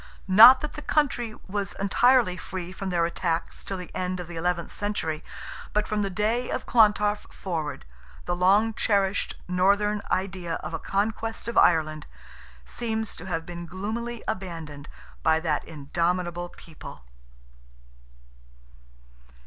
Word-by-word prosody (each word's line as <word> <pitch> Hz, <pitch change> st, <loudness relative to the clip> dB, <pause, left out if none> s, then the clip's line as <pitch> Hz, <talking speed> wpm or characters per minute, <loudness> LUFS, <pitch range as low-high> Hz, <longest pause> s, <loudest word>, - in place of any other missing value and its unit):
Not 230 Hz, +7 st, +10 dB
that 305 Hz, -, -4 dB
the 300 Hz, -, -7 dB
country 245 Hz, -8 st, 0 dB
was 200 Hz, 0 st, -3 dB
entirely 230 Hz, 0 st, +3 dB
free 180 Hz, -1 st, -6 dB
from 190 Hz, +1 st, -5 dB
their 170 Hz, -2 st, +2 dB
attacks 170 Hz, -1 st, -2 dB
till 195 Hz, -, -4 dB
the 180 Hz, -1 st, -9 dB
end 185 Hz, 0 st, -2 dB
of 175 Hz, -, -6 dB
the 175 Hz, -, -8 dB
eleventh 170 Hz, 0 st, -1 dB
century, 160 Hz, -7 st, -2 dB, 0.5 s
but 210 Hz, 0 st, +1 dB
from 215 Hz, 0 st, -1 dB
the 200 Hz, -, 0 dB
day 220 Hz, +6 st, 0 dB
of -, -, -3 dB
Clontarf 210 Hz, -2 st, +3 dB
forward, 160 Hz, -, -4 dB, 0.4 s
the 175 Hz, -, -1 dB
long 200 Hz, +5 st, +4 dB
cherished 200 Hz, -2 st, +1 dB
Northern 200 Hz, +3 st, +2 dB
idea 185 Hz, -3 st, -2 dB
of 155 Hz, +2 st, -6 dB
a -, -, -2 dB
conquest 225 Hz, +3 st, -2 dB
of 235 Hz, -, -3 dB
Ireland, 155 Hz, -2 st, +3 dB, 0.6 s
seems 220 Hz, -, -3 dB
to 180 Hz, -, -9 dB
have 165 Hz, -3 st, -2 dB
been 175 Hz, -1 st, -7 dB
gloomily 220 Hz, +6 st, -4 dB
abandoned 165 Hz, -6 st, -5 dB, 0.3 s
by 160 Hz, 0 st, +3 dB
that 155 Hz, -3 st, 0 dB
indomitable 175 Hz, +3 st, -2 dB
people. 160 Hz, -, -12 dB
185 Hz, 135 wpm, -26 LUFS, 170-210 Hz, 0.6 s, Not